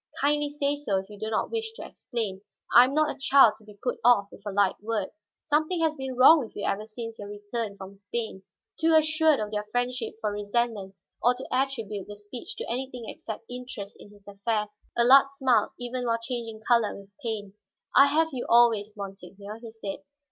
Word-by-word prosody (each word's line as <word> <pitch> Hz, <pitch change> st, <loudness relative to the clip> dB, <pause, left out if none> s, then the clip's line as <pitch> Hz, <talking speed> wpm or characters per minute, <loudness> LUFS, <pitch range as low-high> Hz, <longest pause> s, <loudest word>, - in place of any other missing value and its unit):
"Kindly 295 Hz, +1 st, +2 dB
say 285 Hz, 0 st, 0 dB
so 280 Hz, -10 st, -1 dB
if 190 Hz, +2 st, -5 dB
you 205 Hz, -, -11 dB
do 220 Hz, +1 st, -3 dB
not 220 Hz, -, -1 dB
wish 445 Hz, -1 st, -3 dB
to 450 Hz, -, -8 dB
explain; 210 Hz, -6 st, -4 dB, 0.3 s
I 240 Hz, -, +10 dB
am 270 Hz, +2 st, -3 dB
not 310 Hz, -1 st, +2 dB
a -, -, -23 dB
child 270 Hz, -5 st, +6 dB
to -, -, -20 dB
be 210 Hz, -1 st, -15 dB
put 245 Hz, -, -1 dB
off 225 Hz, -4 st, +5 dB
with -, -, -14 dB
a -, -, -2 dB
light 195 Hz, -1 st, +1 dB
word. 215 Hz, -2 st, -2 dB, 0.3 s
Something 310 Hz, +4 st, +1 dB
has 320 Hz, -1 st, +2 dB
been 265 Hz, -2 st, -5 dB
wrong 265 Hz, +6 st, +8 dB
with 240 Hz, -6 st, -7 dB
you 205 Hz, -, -3 dB
ever 210 Hz, +2 st, -1 dB
since 225 Hz, 0 st, -7 dB
your 205 Hz, -, -7 dB
return 205 Hz, +1 st, -5 dB
from 190 Hz, 0 st, -9 dB
Spain." 205 Hz, 0 st, -5 dB, 0.4 s
Too 320 Hz, 0 st, +4 dB
assured 310 Hz, -1 st, +4 dB
of 210 Hz, -1 st, -3 dB
their 210 Hz, 0 st, -3 dB
friendship 245 Hz, -1 st, -2 dB
for 215 Hz, -2 st, -1 dB
resentment 205 Hz, -1 st, -2 dB, 0.3 s
or 245 Hz, +2 st, +4 dB
to -, -, -8 dB
attribute 230 Hz, -7 st, -1 dB
the 205 Hz, -, -8 dB
speech 245 Hz, -, -8 dB
to 475 Hz, -, -6 dB
anything 255 Hz, -1 st, -4 dB
except 220 Hz, 0 st, -7 dB
interest 245 Hz, -5 st, -7 dB
in -, -, -13 dB
his 205 Hz, -1 st, -20 dB
affairs, 210 Hz, +1 st, -2 dB, 0.3 s
Allard 265 Hz, +3 st, +7 dB
smiled 255 Hz, -6 st, +2 dB
even 245 Hz, 0 st, -3 dB
while 230 Hz, 0 st, +2 dB
changing 230 Hz, -2 st, -5 dB
color 235 Hz, -3 st, +3 dB
with 200 Hz, 0 st, -16 dB
pain. 215 Hz, -5 st, -4 dB, 0.4 s
"I 275 Hz, -, +8 dB
have 320 Hz, +3 st, +2 dB
you 255 Hz, -3 st, -4 dB
always, 225 Hz, -3 st, +4 dB
monseigneur," 200 Hz, +1 st, -8 dB
he 230 Hz, -1 st, -9 dB
said. 220 Hz, -3 st, -6 dB
230 Hz, 205 wpm, -27 LUFS, 205-265 Hz, 0.4 s, I